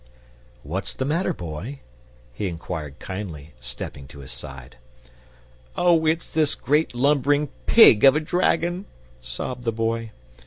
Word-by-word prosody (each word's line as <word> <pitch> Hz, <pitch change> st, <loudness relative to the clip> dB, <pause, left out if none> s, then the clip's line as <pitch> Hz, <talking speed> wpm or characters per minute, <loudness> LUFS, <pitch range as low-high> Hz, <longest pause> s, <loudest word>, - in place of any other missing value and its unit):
"What's 90 Hz, +7 st, -4 dB
the 130 Hz, -, -2 dB
matter, 165 Hz, +6 st, 0 dB
Boy?" 100 Hz, -, -6 dB, 0.5 s
he 105 Hz, -, -3 dB
inquired 80 Hz, -4 st, -6 dB
kindly, 85 Hz, -7 st, -7 dB
stepping 65 Hz, +2 st, -7 dB
to 70 Hz, +1 st, -11 dB
his 65 Hz, -, -10 dB
side. 65 Hz, -1 st, -8 dB, 1.0 s
"Oh, 170 Hz, -3 st, +4 dB
it's 160 Hz, +1 st, +1 dB
this 155 Hz, -2 st, +1 dB
great 150 Hz, +1 st, +1 dB
lumbering 145 Hz, +2 st, +2 dB, 0.2 s
PIG 170 Hz, -, +8 dB
of 135 Hz, +1 st, +8 dB
a -, -, +3 dB
dragon!" 175 Hz, +2 st, 0 dB, 0.4 s
sobbed 65 Hz, -, -5 dB
the 115 Hz, -, 0 dB
Boy. 115 Hz, 0 st, -2 dB
115 Hz, 130 wpm, -24 LUFS, -, 1.0 s, PIG